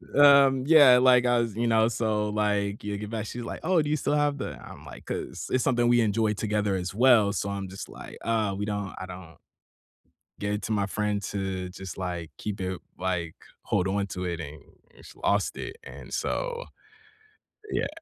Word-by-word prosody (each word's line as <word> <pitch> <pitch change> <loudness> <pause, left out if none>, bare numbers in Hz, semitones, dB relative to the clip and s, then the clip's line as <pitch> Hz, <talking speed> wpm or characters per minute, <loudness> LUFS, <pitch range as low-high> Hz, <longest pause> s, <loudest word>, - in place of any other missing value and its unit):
Um, 140 -2 +6
yeah, 145 -5 +8
like, 125 -1 +5
I 120 -1 +3
was 115 -3 -2
you 120 +1 0
know, 110 0 +4
so, 110 -2 0
like, 105 -1 -1
yeah 105 0 -3
get 105 +1 -6
back, 110 -1 -3
she's 120 +3 -6
like, - - -6
"Oh, 175 -1 +3
do 150 - -2
you 155 - +1
still 145 - -1
have 145 -1 +1
the" - - -5
I'm - - -12
like - - -11
'cause - - -5
it's 130 -1 +2
something 120 -2 +2
we 120 0 +5
enjoy 110 0 +1
together 105 -1 -1
as 90 0 -3
well. 115 -5 +5
So, 100 0 -2
I'm 100 -1 -4
just 95 +1 -8
like, - - -10
"Uh, 110 -4 0
we 105 - -2
don't 100 -2 -3
I 95 - -5
don't 90 -3 -10 1.1
gave 105 0 -1
it 105 - -4
to 110 - -2
my 100 -2 +1
friend 105 0 -1
to 95 -2 -3
just, 95 -2 -8
like, 85 -3 -4
keep 105 -1 -5
it 95 -1 -3 0.2
like, 90 -3 -2 0.3
hold 90 - 0
on 100 +1 0
to 90 0 -5
it 85 -1 -3
and 75 -1 -8 0.4
just - - -15
lost 100 0 0
it." 380 +4 -6
And - - -11
so - - -2 1.1
yeah. - - 0
105 Hz, 205 wpm, -27 LUFS, 95-120 Hz, 1.1 s, yeah